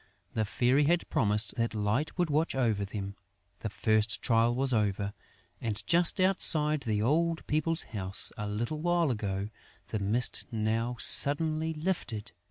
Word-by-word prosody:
The 110 - -1
Fairy 125 +6 +1
had 170 +3 +1
promised 105 -1 +1
that 115 -1 -2
Light 105 +11 -2
would 175 -4 0
watch 155 0 0
over 115 -6 0
them. 100 0 -6 0.5
The 110 - -5
first 110 +1 +1
trial 115 0 +1
was 130 0 0
over; 100 -2 -1 0.5
and, 110 -2 -4
just 170 - +2
as 185 - +4
outside 155 -5 +4
the 105 -4 -2
old 165 +6 0
people's 160 +2 0
house 95 -3 -3
a 105 -2 -5
little 120 +9 -3
while 175 -3 +1
ago, 100 -2 -4 0.4
the 110 - -3
mist 110 +5 +2
now 115 +2 -2
suddenly 155 +2 +4
lifted. 150 - -4
120 Hz, 155 wpm, -29 LUFS, 105-155 Hz, 0.5 s, as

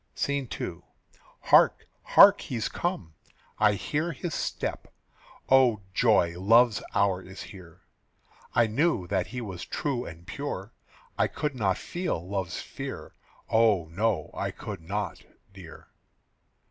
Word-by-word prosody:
SCENE 140 -4 -1
II. - - -5 0.6
"Hark, - - +4 0.2
hark! - - +7
he's 115 -4 -3
come. 170 - -3 0.5
I 105 -1 +5
hear 150 - -2
his 160 +4 -5
step. - - -3 0.6
O 125 -5 +4
joy, 95 -7 +3
love's 115 +3 +4
hour 100 -2 +2
is 95 +1 -10
here. 90 -3 -13 0.7
I 120 - +5
knew 115 - +1
that 95 0 -1
he 125 0 -6
was 95 -6 -6
true 130 -4 -3
and 85 +1 -10
pure, 100 0 -5 0.5
I - - +4
could 150 -1 -3
not 100 -7 0
feel 175 - -4
love's 95 -3 -3
fear. - - -7 0.3
Oh, 105 -7 +3
no; 105 +4 -1
I - - -2
could - - -7
not, 100 +2 -4 0.3
dear." - - -13
105 Hz, 130 wpm, -27 LUFS, 95-125 Hz, 0.7 s, hark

